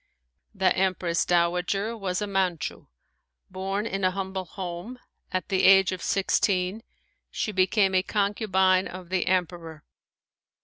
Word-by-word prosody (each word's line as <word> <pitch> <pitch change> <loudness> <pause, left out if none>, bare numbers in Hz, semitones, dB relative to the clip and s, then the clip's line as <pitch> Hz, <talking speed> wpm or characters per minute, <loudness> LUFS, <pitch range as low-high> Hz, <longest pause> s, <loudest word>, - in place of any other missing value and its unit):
The 190 -1 +2
Empress 185 -3 0
Dowager 180 +5 0
was 195 -2 -2
a - - -1
Manchu. 190 -6 -2 0.6
Born 195 +3 -3
in 195 -3 -3
a 185 - +4
humble 190 0 -4
home, 180 +6 -7 0.3
at 185 -1 -3
the 190 -2 +1
age 195 -1 +6
of 185 -2 -5
sixteen 195 +1 0 0.5
she 215 - -3
became 190 +1 +2
a 185 - +4
concubine 190 -2 +1
of 180 -1 -9
the 185 -1 -1
Emperor. 170 -4 -2
190 Hz, 130 wpm, -26 LUFS, 180-195 Hz, 0.6 s, age